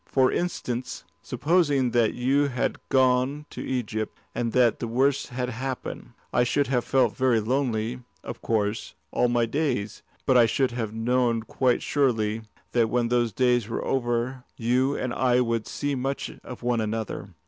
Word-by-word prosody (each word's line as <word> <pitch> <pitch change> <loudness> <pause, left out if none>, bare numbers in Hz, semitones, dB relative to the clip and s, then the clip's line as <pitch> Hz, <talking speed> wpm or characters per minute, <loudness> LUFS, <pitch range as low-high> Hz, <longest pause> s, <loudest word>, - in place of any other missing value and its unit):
For 130 -1 +3
instance, 130 -8 -3 0.2
supposing 145 -6 +1
that 115 -2 +2
you 135 +4 +2
had 125 -3 -1
gone 130 +3 +2
to - - -6
Egypt, 110 -4 -3 0.2
and 115 -1 -1
that 120 -2 +3
the 120 - -3
worst 135 +4 +1
had 125 0 -3
happened, 130 +1 -5 0.2
I 120 - +4
should 140 +4 +1
have 125 -2 0
felt 135 -1 +2
very 130 -3 +3
lonely, 120 0 -1 0.2
of 120 - -7
course, 105 -1 -1 0.2
all 125 - +2
my 120 -1 +2
days, 115 -6 -2 0.2
but 130 - +3
I 120 -1 +6
should 130 +2 +1
have 115 -3 -3
known 115 0 +1
quite 125 +1 +1
surely 115 -6 +1 0.3
that 115 -2 +2
when 120 -1 +1
those 120 -1 +2
days 125 -1 +2
were 115 - -3
over, 125 0 -1
you 125 +4 +1
and 130 -2 -2
I 125 -1 +3
would 115 -2 0
see 145 0 -2
much 135 +1 -2
of 125 -1 -9
one 120 -2 +1
another." 110 -3 -4
125 Hz, 165 wpm, -26 LUFS, 115-130 Hz, 0.3 s, I